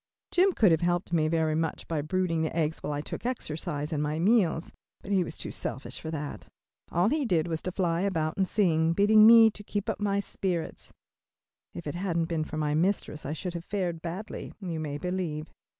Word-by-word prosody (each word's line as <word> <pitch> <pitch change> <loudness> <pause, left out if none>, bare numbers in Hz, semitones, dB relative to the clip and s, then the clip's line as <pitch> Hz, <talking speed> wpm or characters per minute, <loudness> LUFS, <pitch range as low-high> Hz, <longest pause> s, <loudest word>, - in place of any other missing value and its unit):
Jim 375 +2 +4
could 215 - +4
have 160 - +3
helped 175 0 0
me 155 -2 +3
very 160 -1 +1
much 160 0 -2
by 160 -3 -1
brooding 165 +1 0
the 160 - -2
eggs 160 -1 0
while - - -3
I 145 0 -2
took - - -6
exercise 155 - -3
and 150 - 0
my 150 +1 -1
meals, 180 -3 +2 0.3
but 200 - -6
he 190 -2 +3
was 165 - -7
too - - -4
selfish 130 - -5
for 160 - -5
that. 145 - -5 0.4
All 175 +5 +3
he 300 +2 +1
did 175 -10 +1
was 160 -2 -3
to 185 - -3
fly 175 -2 0
about 165 -5 0
and 190 -1 +1
sing, 165 -6 +2
bidding 215 +3 +6
me 225 -1 +9
to 205 - -11
keep 205 0 -2
my 200 -1 +1
spirits 185 -4 -3
up. - - -26 0.8
If 170 - -7
it 145 - -3
hadn't 175 -2 -1
been 165 -2 -2
for 155 - -6
my 150 -1 0
mistress 160 -3 0
I 150 - -2
should 175 +3 -4
have 170 -1 -5
fared 180 -5 -2
badly, 180 +6 -6
you 175 -5 -4
may 145 -2 -3
believe. 170 -2 -3
170 Hz, 215 wpm, -28 LUFS, 155-195 Hz, 0.8 s, me